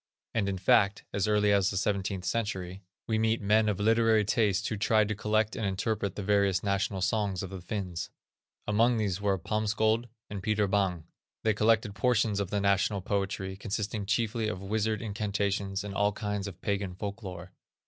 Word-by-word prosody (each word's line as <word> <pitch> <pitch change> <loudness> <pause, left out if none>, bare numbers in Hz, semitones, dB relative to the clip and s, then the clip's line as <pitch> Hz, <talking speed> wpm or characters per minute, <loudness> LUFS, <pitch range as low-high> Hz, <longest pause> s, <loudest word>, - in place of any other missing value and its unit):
And, 100 -3 +1
in 95 - -2
fact, 100 +2 +3
as 100 0 0
early 105 -1 +3
as 100 -2 +3
the 100 - -3
seventeenth 95 -1 -1
century, 95 -5 -2 0.2
we 110 -1 0
meet 110 +1 +2
men 105 +1 +3
of 100 - -1
literary 110 0 +3
tastes 100 -1 +1
who - - -2
tried 105 +1 +3
to - - 0
collect 110 +1 0
and - - -4
interpret 100 0 -1
the 105 - -4
various 100 -2 +2
national 100 -1 0
songs 100 -1 0
of 95 - -6
the 95 -2 -7
Finns. 90 -3 -4 0.6
Among 115 +3 +3
these 100 -3 -1
were 100 -1 +1
Palmsköld 110 +4 0 0.2
and 100 -2 -6
Peter 105 0 +1
Bäng. 95 -4 0 0.4
They 110 - +3
collected 110 0 +2
portions 110 -1 +1
of 100 -3 -2
the 105 - 0
national 100 0 +2
poetry, 95 0 -2
consisting 100 0 -3
chiefly 110 +2 0
of 100 - -3
wizard 110 +2 -1
incantations, 100 -2 -1
and 100 -1 -6
all 100 +1 +2
kinds 105 -2 -3
of 95 -3 -9
pagan 100 -2 -2
folk 100 +3 -5
lore. 90 -3 -8
100 Hz, 180 wpm, -29 LUFS, 95-110 Hz, 0.6 s, fact